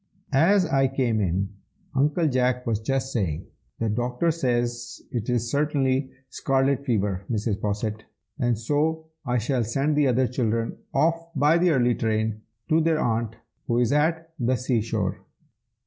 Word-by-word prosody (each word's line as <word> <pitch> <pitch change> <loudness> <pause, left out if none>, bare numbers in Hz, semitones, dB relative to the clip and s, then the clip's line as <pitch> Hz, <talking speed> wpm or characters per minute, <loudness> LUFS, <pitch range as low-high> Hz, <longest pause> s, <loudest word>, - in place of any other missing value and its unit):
As 180 +7 +5
I 135 -4 +2
came 125 -5 0
in, 95 +1 0 0.4
Uncle 150 +4 +2
Jack 125 -2 +1
was 110 -3 0
just 135 +3 -1
saying 90 -10 -1 0.3
"The 115 - -1
doctor 125 +9 0
says 120 -5 -1
it 120 -1 -3
is 120 -1 0
certainly 140 -2 +1 0.2
scarlet 135 +1 +1
fever, 100 -7 0
Mrs. 105 -2 -1
Posset, 105 +1 -2 0.5
so 150 +8 0 0.2
I 125 0 +2
shall 125 +2 0
send 135 +7 0
the 145 -1 +3
other 130 +1 +3
children 115 -2 -1
off 165 +1 +1
by 150 +4 +4
the 180 +1 +4
early 125 -5 +3
train, 110 -1 -1 0.3
to 160 +1 +4
their 160 -1 +2
aunt, 115 -3 0 0.3
who 120 - +1
is 120 -1 +2
at 160 +2 +1
the 125 +1 +2
sea 125 -3 0
shore." 105 -4 -2
125 Hz, 150 wpm, -25 LUFS, 115-145 Hz, 0.5 s, As